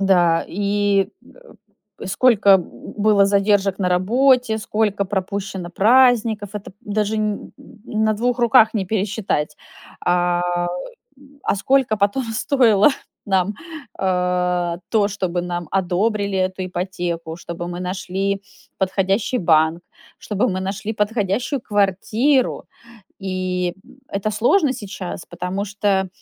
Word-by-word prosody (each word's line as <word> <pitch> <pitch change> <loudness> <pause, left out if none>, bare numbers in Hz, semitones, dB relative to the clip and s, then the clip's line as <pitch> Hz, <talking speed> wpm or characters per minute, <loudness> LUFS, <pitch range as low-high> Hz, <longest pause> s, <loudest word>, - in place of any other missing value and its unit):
да, 175 -4 +3
и, 200 0 +1 0.9
э, - - -6
сколько 200 -2 +5
б 175 - -7 0.3
было 205 -1 +4
задержек 200 -1 +2
на 185 - +1
работе, 230 +5 +3
сколько 210 -2 0
пропущено 190 -2 -4
праздников, 225 -1 +3
это 205 -2 -6
п 195 - -45
даже 210 +1 -1
н 210 -1 -2 0.4
н 220 0 0
на 215 - +3
2 245 +3 0
руках 230 -2 +5
не 195 -3 -1
пересчитать, 195 -7 -1 0.4
а, 175 0 +1 1.0
а - - +1
сколько 260 0 +2
потом 205 +6 +1
стоило 225 -3 +4 0.4
нам, 190 +1 +1 0.4
а, 180 -2 0
то, 210 -3 +3
чтобы 185 -3 -2
нам 175 -2 -4
одобрили 195 +2 0
эту 185 0 -1
ипотеку, 175 -3 -4
чтобы 170 0 -6
мы 175 0 -5
нашли 195 +1 -2 0.4
подходящий 195 +5 0
банк, 160 -2 +3 0.4
чтобы 210 -1 -1
мы 185 0 -2
нашли 205 +3 -3
подходящую 210 +5 -1
квартиру. 215 +7 +1 0.6
И, 185 -2 -2
м, 270 - -19
это 200 +2 -2
сложно 260 - +3
сейчас, 195 -6 -7
потому 180 +3 -4
что, 200 -1 0
200 Hz, 120 wpm, -21 LUFS, 185-215 Hz, 1.0 s, сколько